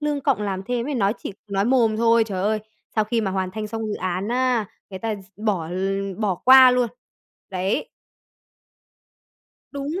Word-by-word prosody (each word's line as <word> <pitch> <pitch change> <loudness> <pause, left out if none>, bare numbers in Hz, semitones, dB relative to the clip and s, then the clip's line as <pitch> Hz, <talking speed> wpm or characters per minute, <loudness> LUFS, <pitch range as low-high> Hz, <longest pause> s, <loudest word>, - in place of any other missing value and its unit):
lương 295 -1 -1
cộng 265 -7 +1
làm 195 -2 -2
thêm 240 +3 -2
ấy, 295 - -2
nói 205 -3 +2
chỉ - - -6 0.2
nói 195 0 0
mồm 230 -3 +3
thôi. 230 0 +4
Trời 190 -4 -4
ơi, 215 +1 +1 0.4
sau 215 - +3
khi 230 +2 0
mà 195 -3 -1
hoàn 185 -1 -2
thành 215 +2 -4
xong 225 0 -4
dự 210 - -2
án 185 +3 -3
á, 245 -3 +1 0.2
người 190 - -6
ta 225 0 -2 0.2
bỏ 200 -7 -1
l 195 +1 -2
bỏ 205 -4 +1
qua 260 0 +9
luôn. 250 -1 +2 0.6
Đấy. 190 +1 -1 1.8
Đúng 285 +5 -4
215 Hz, 180 wpm, -23 LUFS, 195-245 Hz, 1.8 s, qua